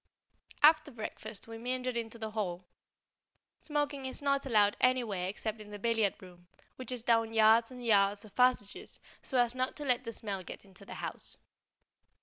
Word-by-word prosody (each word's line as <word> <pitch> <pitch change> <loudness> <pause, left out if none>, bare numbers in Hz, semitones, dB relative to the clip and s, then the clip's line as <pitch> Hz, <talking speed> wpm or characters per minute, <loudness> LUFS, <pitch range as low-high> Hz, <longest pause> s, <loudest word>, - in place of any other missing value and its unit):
After 310 0 +6
breakfast 220 -3 -7
we 225 0 -8
meandered 250 +1 -2
into 230 0 -3
the 220 -1 -5
hall. 185 -4 -3 1.0
Smoking 290 -3 -2
is 260 - -5
not 275 -1 0
allowed 210 -4 +4
anywhere 235 -8 +2
except 215 +2 -4
in 210 - -11
the 205 - -7
billiard 225 -1 +1
room, 175 -1 -15 0.3
which 255 -1 -5
is 245 -3 -1
down 225 -1 +2
yards 225 +1 +6
and 250 -2 -9
yards 200 -1 +3
of 210 - -15
passages, 250 -5 +1 0.2
so 265 - -2
as 240 -1 +3
not 255 0 -2
to 295 - -6
let 250 -2 +2
the 230 - -5
smell 200 -4 -3
get 185 - -10
into 195 0 -12
the - - -8
house. - - -6
225 Hz, 175 wpm, -32 LUFS, 205-255 Hz, 1.0 s, After